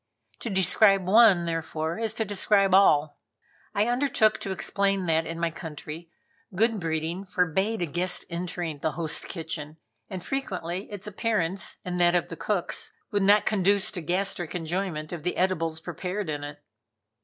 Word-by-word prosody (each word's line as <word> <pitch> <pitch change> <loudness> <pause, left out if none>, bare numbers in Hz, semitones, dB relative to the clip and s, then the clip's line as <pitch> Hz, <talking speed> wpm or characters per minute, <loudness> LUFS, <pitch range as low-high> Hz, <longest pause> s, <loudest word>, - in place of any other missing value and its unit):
To 235 - -4
describe 195 0 +4
one, 195 -3 +6
therefore, 165 +1 -3
is 225 -1 -1
to 220 - -1
describe 200 -1 +2
all. 150 -6 +4 0.6
I 205 +1 +3
undertook 245 -3 +2
to 195 - -4
explain 195 0 0
that 160 -1 +1
in 165 0 -5
my 170 -1 0
country, 160 +1 -8 0.5
good 225 +2 +2
breeding 165 +2 -2
forbade 190 +3 0
a - - +1
guest 175 +4 +1
entering 170 -3 -4
the 155 - -1
host's 160 -2 -1
kitchen, 160 -2 -6 0.3
and 185 -2 -6
frequently 190 -8 -3
its 205 0 -7
appearance, 200 -3 -1
and 180 -1 -2
that 175 0 +5
of 175 - +1
the 165 - -6
cook's, 195 0 -2 0.2
would 205 - +1
not 205 +2 +5
conduce 200 -1 +2
to 180 - -4
gastric 180 0 -2
enjoyment 170 -2 -3
of 170 - -5
the 180 +3 -2
edibles 165 -4 0
prepared 180 +3 -4
in 145 -1 -4
it. 145 0 -8
180 Hz, 160 wpm, -27 LUFS, 165-200 Hz, 0.6 s, one